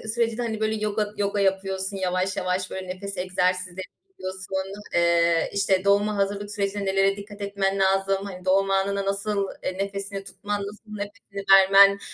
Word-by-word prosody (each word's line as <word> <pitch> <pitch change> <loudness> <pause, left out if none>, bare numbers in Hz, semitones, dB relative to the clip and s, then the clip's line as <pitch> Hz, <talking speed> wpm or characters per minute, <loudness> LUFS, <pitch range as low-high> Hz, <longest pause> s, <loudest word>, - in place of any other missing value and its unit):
sürecinde, 230 0 0
hani, 220 -2 -2
böyle 220 0 0
yoga 215 0 -1
yoga 200 0 0
yapıyorsun, 195 0 0
yavaş 185 0 -1
yavaş 185 0 -1
böyle 190 -1 -5
nefes 195 +1 -6
egzersizleri 185 0 -1 0.2
yapıyorsun. 190 - -5 0.2
Eee, 170 -1 +3
işte, 195 -1 +1
doğuma 205 +1 +3
hazırlık 200 +1 -1
sürecinde 200 -1 -2
nelere 195 +1 +2
dikkat 205 0 -10
etmen 200 -1 -1
lazım? 195 0 +2
Hani, 185 -2 -8
doğum 195 +1 +3
anına 195 +1 +1
nasıl, 200 0 -1 0.2
eee, 185 - -3
nefesini 195 0 -4
tutman, 205 +1 -4
nasıl 210 +2 -8
nefesini 200 -1 -7
vermen 195 +1 +7
195 Hz, 155 wpm, -25 LUFS, 190-200 Hz, 0.2 s, vermen